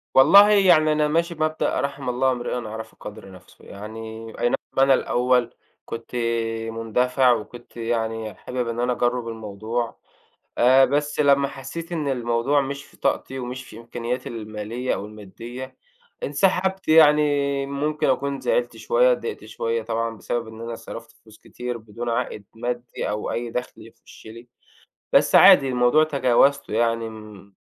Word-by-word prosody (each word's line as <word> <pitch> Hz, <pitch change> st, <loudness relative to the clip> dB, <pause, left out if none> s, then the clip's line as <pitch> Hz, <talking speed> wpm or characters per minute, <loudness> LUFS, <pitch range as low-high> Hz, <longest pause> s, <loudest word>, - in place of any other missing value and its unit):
والله 200 Hz, +10 st, +8 dB
يعني 185 Hz, -7 st, +5 dB
أنا 150 Hz, 0 st, +2 dB
ماشي 170 Hz, +3 st, 0 dB
بمبدأ 155 Hz, 0 st, -1 dB
رحم 140 Hz, -2 st, -3 dB
الله 130 Hz, +2 st, +1 dB
امرئٍ 125 Hz, -1 st, -3 dB
عرف 110 Hz, +1 st, -8 dB
قَدر 100 Hz, -2 st, -10 dB
نفسه، 90 Hz, -, -17 dB
يعني 110 Hz, +2 st, -8 dB
أي 120 Hz, -, +2 dB
نعم -, -, +2 dB, 0.2 s
أنا 135 Hz, 0 st, +6 dB
الأول 125 Hz, -1 st, +1 dB, 0.3 s
كنت 115 Hz, +1 st, -8 dB, 0.5 s
مندفع، 125 Hz, +3 st, +1 dB
وكنت 120 Hz, +2 st, -8 dB
يعني 115 Hz, -2 st, -2 dB
حابب 125 Hz, +3 st, -4 dB
إن 115 Hz, 0 st, -4 dB
أنا 125 Hz, +1 st, +1 dB
أجرّب 120 Hz, -1 st, -1 dB
الموضوع، 110 Hz, +1 st, -4 dB, 0.6 s
آآ 130 Hz, +2 st, +6 dB
بس 145 Hz, +2 st, 0 dB
لمّا 140 Hz, -1 st, +4 dB
حسّيت 165 Hz, +6 st, -8 dB
إن 155 Hz, -4 st, -2 dB
الموضوع 120 Hz, +2 st, +1 dB
مش 140 Hz, 0 st, -5 dB
في -, -, -21 dB
طاقتي، 135 Hz, -, -2 dB
ومش 125 Hz, +1 st, -6 dB
في 110 Hz, -, -12 dB
إمكانياتي 120 Hz, +2 st, -5 dB
المالية 110 Hz, +2 st, -4 dB
أو 100 Hz, -, -5 dB
المادية، 115 Hz, +5 st, -10 dB, 0.5 s
انسحبت. 190 Hz, -, 0 dB
يعني 145 Hz, -3 st, +4 dB
ممكن 150 Hz, +2 st, -1 dB
أكون 140 Hz, +1 st, 0 dB
زعلت -, -, 0 dB
شوية، -, -, +3 dB
اتضايقت 455 Hz, -2 st, -4 dB
شوية 115 Hz, 0 st, -3 dB
طبعًا، 115 Hz, 0 st, -3 dB
بسبب 115 Hz, +1 st, -3 dB
إن 110 Hz, 0 st, -11 dB
أنا 115 Hz, 0 st, -5 dB
صرفت -, -, -10 dB
فلوس -, -, -20 dB
كتير 125 Hz, -1 st, -6 dB
بدون 115 Hz, +2 st, -7 dB
عائد 110 Hz, -2 st, -3 dB
مادي، 120 Hz, +1 st, -4 dB
أو 105 Hz, 0 st, -3 dB
أي 120 Hz, 0 st, -3 dB
دخل 125 Hz, +2 st, -4 dB
يخش -, -, -17 dB
لي، 115 Hz, +2 st, -11 dB, 0.6 s
بس -, -, +4 dB
عادي 135 Hz, -, +8 dB
الموضوع 125 Hz, +4 st, +3 dB
تجاوزته، 140 Hz, -2 st, +2 dB
يعني 115 Hz, 0 st, +1 dB
م 105 Hz, -3 st, -12 dB
125 Hz, 150 wpm, -23 LUFS, 115-140 Hz, 0.6 s, والله